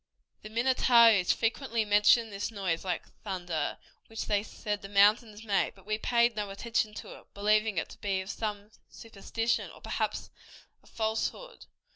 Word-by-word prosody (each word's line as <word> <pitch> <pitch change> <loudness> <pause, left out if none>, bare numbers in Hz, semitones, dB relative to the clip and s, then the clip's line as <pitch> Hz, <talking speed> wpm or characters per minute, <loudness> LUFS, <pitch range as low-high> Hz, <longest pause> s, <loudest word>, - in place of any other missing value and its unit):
The 215 - -9
Minnetarees 235 -4 +4
frequently 230 -1 -1
mentioned 210 +2 +4
this 200 +2 -3
noise 190 -7 -2
like 185 -2 -3 0.2
thunder, 175 -7 -3 0.3
which 225 - -5
they 205 -1 +1
said 210 -1 -5
the 195 - -9
mountains 210 +2 +3
made; 205 -3 0
but 195 -1 -19
we 215 +1 -2
paid 235 0 +2
no 210 -1 -3
attention 215 +1 -2
to - - -9
it, - - -24
believing 210 0 +2
it - - -1
to - - -12
have - - -43
been 190 -2 -1
some 210 0 -5 0.2
superstition, 225 +1 -3
or - - -14
perhaps - - -3 0.5
a - - -24
falsehood. 225 - -3
215 Hz, 160 wpm, -29 LUFS, 200-225 Hz, 0.5 s, Minnetarees